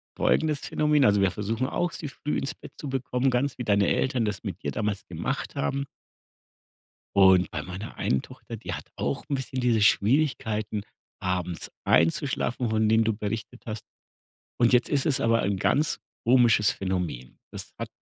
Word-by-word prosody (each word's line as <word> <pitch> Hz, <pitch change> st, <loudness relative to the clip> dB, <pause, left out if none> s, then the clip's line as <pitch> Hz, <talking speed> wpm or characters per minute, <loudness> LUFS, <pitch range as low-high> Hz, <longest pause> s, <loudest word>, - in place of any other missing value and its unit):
folgendes 155 Hz, -3 st, +2 dB
Phänomen, 150 Hz, -2 st, +2 dB
also 100 Hz, -1 st, +4 dB
wir 95 Hz, -2 st, +3 dB
versuchen 115 Hz, +5 st, -2 dB
auch, 175 Hz, +4 st, -1 dB
sie 155 Hz, -, -5 dB
früh 145 Hz, +1 st, -3 dB
ins 135 Hz, -, -2 dB, 0.2 s
zu 145 Hz, -, -6 dB
bekommen, 130 Hz, 0 st, 0 dB
ganz 125 Hz, +2 st, 0 dB
wie 125 Hz, -, -3 dB
deine 100 Hz, -3 st, +3 dB
Eltern 130 Hz, -3 st, +1 dB
das 105 Hz, -2 st, -3 dB
mit -, -, -5 dB
dir -, -, -1 dB
damals 105 Hz, -2 st, -2 dB
gemacht -, -, -4 dB
haben. 140 Hz, -, -1 dB, 1.3 s
Und 95 Hz, -2 st, +6 dB
bei -, -, -4 dB
meiner 95 Hz, +3 st, -7 dB
einen 65 Hz, -, 0 dB
Tochter, -, -, -10 dB
die -, -, -6 dB
hat -, -, -5 dB
auch 70 Hz, -1 st, -2 dB
'n 140 Hz, -, 0 dB
bisschen 130 Hz, -1 st, -3 dB
diese 120 Hz, -3 st, +2 dB
Schwierigkeiten, 110 Hz, -2 st, +2 dB, 0.4 s
abends 90 Hz, -3 st, -2 dB
einzuschlafen, 120 Hz, -, +1 dB
von 110 Hz, 0 st, +2 dB
denen 110 Hz, +1 st, +4 dB
du 110 Hz, -, +2 dB
berichtet 110 Hz, +3 st, -5 dB
hast. 110 Hz, -1 st, -5 dB, 0.7 s
Und 120 Hz, 0 st, +4 dB
jetzt 125 Hz, 0 st, +4 dB
ist 140 Hz, +1 st, +1 dB
es 140 Hz, -5 st, +2 dB
aber 115 Hz, 0 st, +3 dB
ein 100 Hz, -1 st, 0 dB
ganz 150 Hz, -, +2 dB, 0.3 s
komisches 120 Hz, -4 st, +5 dB
Phänomen. 90 Hz, -10 st, -4 dB
Das -, -, -6 dB
hat -, -, -4 dB
110 Hz, 170 wpm, -26 LUFS, 100-130 Hz, 1.3 s, Und